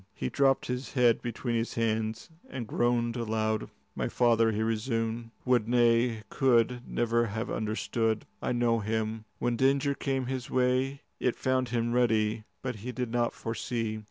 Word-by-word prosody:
He 65 - -2
dropped 135 - +2
his 125 +1 -4
head 120 -4 +4
between 120 +1 -3
his 115 0 -1
hands 110 +2 -1 0.2
and 125 -3 -5
groaned 120 +1 +1
aloud. 110 -2 -1 0.2
"My - - -2
father," 115 -2 +3
he 110 +1 -1
resumed, 115 0 -1 0.2
"would, 125 -4 +3
nay, 120 -1 +3
could, 125 -2 +3
never 120 0 +1
have 110 +3 -3
understood. 110 0 -1 0.2
I - - -1
know 120 -1 +2
him. 110 +1 -2
When 120 -1 0
danger 140 +2 +3
came 135 -2 -1
his 130 -1 -4
way, 130 +2 +1 0.2
it 125 - +1
found 130 -1 0
him 120 0 0
ready, 110 -3 +2 0.2
but 125 -4 -3
he 120 +5 -5
did 125 -2 -3
not 120 0 +1
foresee. 115 -1 -3
120 Hz, 155 wpm, -29 LUFS, 110-125 Hz, 0.2 s, head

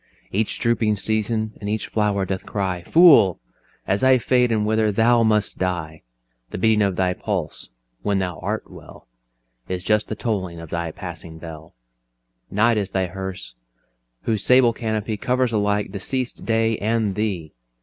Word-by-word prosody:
Each 105 +2 -1
drooping 115 -2 +1
season 110 +1 -1
and 100 - -4
each 110 +1 -1
flower 105 -3 0
doth 95 0 -3
cry, 95 -3 -3
"Fool! 145 - +6 0.5
as 100 +4 0
I 130 0 +6
fade 125 0 +2
and 110 -2 +1
wither, 110 0 +2
thou 115 +3 +3
must 110 -2 +1
die. 80 -4 -3 0.5
"The - - -6
beating 110 +2 +3
of 100 -3 +1
thy 90 0 +1
pulse 90 -6 -4 0.3
(when 100 -1 0
thou 90 -4 -3
art - - -3
well) - - -14 0.6
Is 90 -1 -3
just 105 +1 +1
the 110 - -4
tolling 95 -7 -3
of 80 -1 -10
thy 85 -1 -2
Passing 80 +1 -9
Bell: 80 -1 -10 0.7
Night 115 +3 +2
is 100 - -3
thy 95 -1 0
Hearse, 95 -4 -6 0.7
whose 110 -4 0
sable 125 -2 +5
Canopy 110 -1 -3
Covers 125 +1 0
alike 105 -1 0
deceased 120 +6 -3
day 115 -1 +1
and 110 -1 0
thee. 95 -7 -3
105 Hz, 160 wpm, -22 LUFS, 95-110 Hz, 0.7 s, Fool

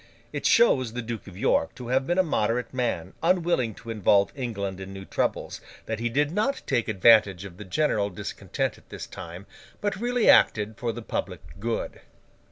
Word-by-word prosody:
It - - 0
shows 130 - +4
the 125 0 -4
Duke 115 -2 -6
of 95 -2 -11
York 80 - +1
to 125 -2 -8
have 130 +1 +1
been 175 - +1
a 185 - +5
moderate 120 -7 -1
man, 120 -10 -2
unwilling 165 - +1
to 115 - -8
involve 100 -2 +3
England 100 -8 -4
in 95 0 -7
new 95 0 -8
troubles, - - -2 0.2
that 110 -1 -3
he 120 +1 -1
did 145 +5 +1
not 215 +10 0
take 120 - 0
advantage 105 -3 +4
of 90 -3 -10
the 105 - -9
general 105 -2 +1
discontent 90 - -4
at - - -28
this - - -7
time, 85 +3 -9 0.3
but 205 -1 -1
really 245 -1 +1
acted 105 0 +5
for 120 +1 -2
the 120 +1 -7
public - - -4 0.2
good. 115 +2 -3
115 Hz, 185 wpm, -26 LUFS, 100-140 Hz, 0.3 s, a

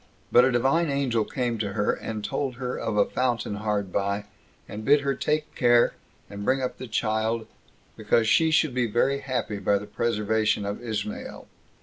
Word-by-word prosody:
But 125 - +7
a 130 - +2
Divine 135 +7 +2
Angel 135 -5 +1
came 120 -1 -2
to 100 -2 -2
her, 105 +1 +1
and 110 -2 -5
told 135 +1 -2
her 125 0 -4
of 110 -2 -3
a 100 - +5
fountain 120 -5 -1
hard 105 -3 -2
by, 100 +1 -1 0.4
and 105 +1 -7
bid 145 +4 +5
her 140 -1 0
take 150 +3 -1
care, 120 -1 +4 0.3
and 100 0 -7
bring 130 +5 +2
up 130 -1 -3
the 130 - -6
child, 110 0 -1 0.5
because 115 -1 +1
she 160 +8 +4
should 155 -3 +2
be 125 -1 +1
very 130 +5 +1
happy 125 -6 -3
by 100 +1 +2
the 100 - -6
preservation 110 -2 0
of 100 +1 -4
Ismael. 215 - -5
115 Hz, 185 wpm, -26 LUFS, 105-130 Hz, 0.5 s, But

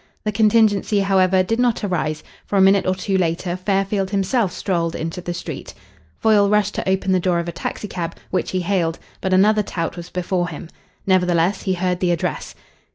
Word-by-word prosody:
The 215 - -1
contingency, 210 -1 +3
however, 190 -1 +3
did 225 +5 -1
not 240 -3 +1
arise, 155 -5 -2 0.2
for 200 - 0
a - - +5
minute 195 0 +4
or 185 - +2
two 190 +1 -1
later 175 +1 -1
Fairfield 195 +1 0
himself 200 +1 0
strolled 170 -4 -2
into 165 +2 -4
the 175 - -4
street. 175 - -7 0.4
Foyle 210 -2 +4
rushed 210 -1 +2
to - - -2
open 190 0 +1
the 185 - +3
door 180 -1 +1
of 170 0 -2
a - - -2
taxicab, 170 0 -5 0.2
which 185 - -1
he 185 - -1
hailed, 170 -3 0 0.2
but 190 - -1
another 210 +3 +4
tout 170 -3 -4
was 175 0 -8
before 180 0 -1
him. 160 +1 -8 0.4
Nevertheless, 180 0 +2
he 190 -1 -1
heard 180 0 -1
the 180 - +1
address. 170 -2 -2
185 Hz, 190 wpm, -21 LUFS, 175-200 Hz, 0.4 s, a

